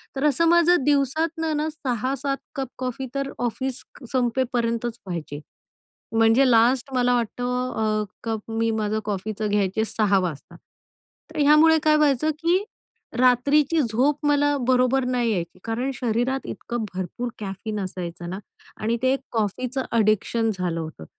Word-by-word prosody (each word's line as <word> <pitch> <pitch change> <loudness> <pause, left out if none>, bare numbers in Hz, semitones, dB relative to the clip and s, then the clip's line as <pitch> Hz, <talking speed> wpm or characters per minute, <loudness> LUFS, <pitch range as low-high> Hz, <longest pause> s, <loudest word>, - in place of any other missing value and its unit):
तर 270 - -2
असं 300 +3 +3
माझं 345 -2 +4
दिवसातून 300 +4 +1
ना 305 +1 0
6-7 275 -1 -2 0.2
कप 270 -2 -2
कॉफी 260 +1 -4
तर 275 0 -2
ऑफिस 250 +2 -3
क 265 - -15
संपेपर्यंतच 240 -2 0
प्यायचे. 165 -5 -5 0.8
म्हणजे 225 +4 +5
लास्ट 245 +3 +3
मला 245 -1 +2
वाटतं 245 +2 -2
अ, 215 -1 +1 0.2
कप 225 -1 -4
मी 225 0 0
माझं 215 0 0
कॉफीचं 210 +1 -3
घ्यायचे 205 +1 +1
6 205 -3 +2
वाजता. 170 -6 -5 0.8
तर 310 - -4
यामुळे 300 +2 +6
काय 305 -1 +5
व्हायचं 300 0 +3
की 360 +4 +3 0.5
रात्रीची 280 +5 +3
झोप 265 +5 +1
मला 290 0 +3
बरोबर 255 +1 +3
नाही 245 -2 +1
यायची, 175 -2 -3
कारण 230 +4 -2
शरीरात 245 +2 -1
इतकं 240 -2 -4
भरपूर 190 +7 -4
कॅफीन 210 +1 -5
असायचं 175 -2 -5
ना 190 +2 -5 0.4
आणि 225 +2 0
ते 260 +1 +4 0.2
कॉफीचं 250 +4 -1
एडिक्शन 220 +1 +2
झालं 175 -2 -1
होतं, 155 - -7
245 Hz, 140 wpm, -24 LUFS, 215-275 Hz, 0.8 s, यामुळे